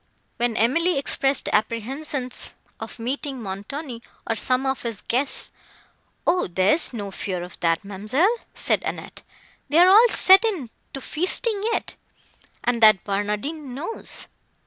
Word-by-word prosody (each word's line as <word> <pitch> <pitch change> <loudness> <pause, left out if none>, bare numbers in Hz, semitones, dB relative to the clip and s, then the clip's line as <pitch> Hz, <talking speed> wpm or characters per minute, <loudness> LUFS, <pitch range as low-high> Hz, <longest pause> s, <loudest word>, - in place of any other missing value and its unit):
When 240 -2 -1
Emily 320 +9 +2
expressed 275 0 +1
apprehensions 250 +5 -2 0.2
of - - -8
meeting 265 +3 -4
Montoni, 230 +6 -7 0.3
or 225 - +1
some 255 +4 0
of 265 0 -1
his 230 -3 -5
guests, 265 +4 +1 0.7
"O, 360 +2 +2
there 185 +2 +2
is 325 - +4
no 205 -5 -6
fear 185 -2 -4
of 180 - -10
that, 165 +1 0
ma'amselle," 240 - 0 0.2
said - - 0
Annette, - - -6 0.5
"they 295 - +1
are 355 +2 +7
all 445 +5 +7
set 380 0 +6
in 355 - -2 0.2
to 270 - -6
feasting 395 - +1
yet, - - -3 0.7
and 240 -1 0
that 215 -4 +6
Barnardine 210 +8 -3
knows." 340 +11 -7
255 Hz, 140 wpm, -23 LUFS, 215-310 Hz, 0.7 s, are